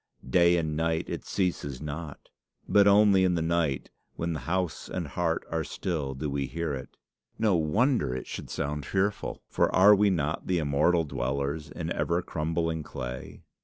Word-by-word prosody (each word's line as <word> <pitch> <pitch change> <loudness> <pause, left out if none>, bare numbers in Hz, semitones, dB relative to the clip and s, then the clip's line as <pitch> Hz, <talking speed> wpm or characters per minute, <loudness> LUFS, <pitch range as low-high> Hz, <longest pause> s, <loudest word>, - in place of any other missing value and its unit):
Day 85 +6 +4
and 80 -2 -1
night 80 +1 0
it - - -5
ceases 85 -9 -2
not; 75 0 -7 0.4
but 100 0 +5
only 100 -1 +6
in 90 -1 +3
the 85 - 0
night, 80 -4 0 0.2
when 85 0 -2
house 85 +4 -2
and 85 -5 -4
heart 85 +1 -1
are 80 -1 0
still, 75 -6 -3
do 75 +3 -3
we 70 -1 -2
hear 80 +1 -3
it. 65 -2 -7 0.4
No 110 -4 +3
wonder 95 - +2
it 65 - -5
should - - -7
sound 75 0 -3
fearful! 100 +6 -1
for - - +1
are 100 +3 +8
we 105 0 +4
not 80 -4 -1
the 90 - +2
immortal 80 +3 +2
dwellers 70 +2 -2
in 80 +2 -4
ever 85 +1 0
crumbling 80 0 -1
clay? 65 -3 -7
80 Hz, 165 wpm, -28 LUFS, 75-90 Hz, 0.4 s, are